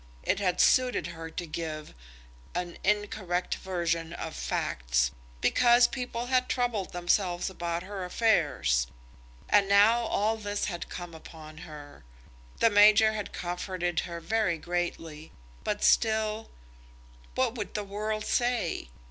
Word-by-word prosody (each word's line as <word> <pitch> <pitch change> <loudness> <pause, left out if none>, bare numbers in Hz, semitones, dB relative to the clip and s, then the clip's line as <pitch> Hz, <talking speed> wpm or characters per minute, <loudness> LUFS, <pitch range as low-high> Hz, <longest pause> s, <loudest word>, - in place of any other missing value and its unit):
It - - +1
had 180 -3 0
suited 255 -1 +4
her 165 0 -7
to 175 +2 -5
give 155 -1 -5 0.6
an 175 -1 -4
incorrect 200 -4 0
version 170 -3 -2
of 160 -2 -6
facts, - - 0 0.3
because 240 0 +5
people 245 -2 -4
had 255 0 +1
troubled 240 -6 -1
themselves 175 +1 0
about 170 -1 -3
her 195 0 -6
affairs; 150 - +2 0.6
and 200 -1 +4
now 205 +4 +6
all 220 -1 0
this 205 -1 -2
had 175 -4 -5
come 175 -1 -7
upon 155 -1 -11
her! 145 - -11 0.6
The 230 - +5
major 215 +2 +6
had 210 -2 -4
comforted 175 0 -2
her 170 -1 -4
very 180 0 0
greatly; 165 -2 -4 0.3
but 210 0 -2
still, 220 -1 +2 0.9
what 255 -3 +1
would 215 -5 -6
the 210 - -1
world 215 +2 -3
say? 240 - 0
185 Hz, 130 wpm, -28 LUFS, 170-215 Hz, 0.9 s, now